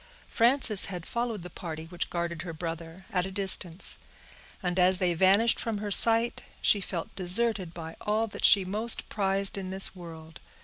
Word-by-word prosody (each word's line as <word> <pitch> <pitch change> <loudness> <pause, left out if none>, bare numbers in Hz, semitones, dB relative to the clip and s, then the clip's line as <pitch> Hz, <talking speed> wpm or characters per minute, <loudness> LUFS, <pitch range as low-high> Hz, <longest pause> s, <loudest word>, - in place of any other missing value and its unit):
Frances 235 -3 +3
had 180 -3 -7
followed 235 -5 -4
the 180 - -10
party 160 -2 -8
which 175 +1 -4
guarded 170 -2 -4
her 165 -1 -7
brother, 165 +2 -7
at 180 0 -1
a - - -9
distance; 190 -3 0 0.6
and 180 0 -2
as 180 +1 +4
they 180 -2 0
vanished 195 +7 +3
from 225 -2 -3
her 205 0 -5
sight, 230 +3 +4 0.2
she 205 - +3
felt 175 -3 -5
deserted 190 0 0
by 165 -1 -9
all 215 +2 0
that 220 - -10
she 195 -2 +6
most 215 +5 0
prized 195 -1 +1
in 185 -1 -7
this 190 0 +3
world. 165 -2 -12
190 Hz, 175 wpm, -27 LUFS, 170-210 Hz, 0.6 s, she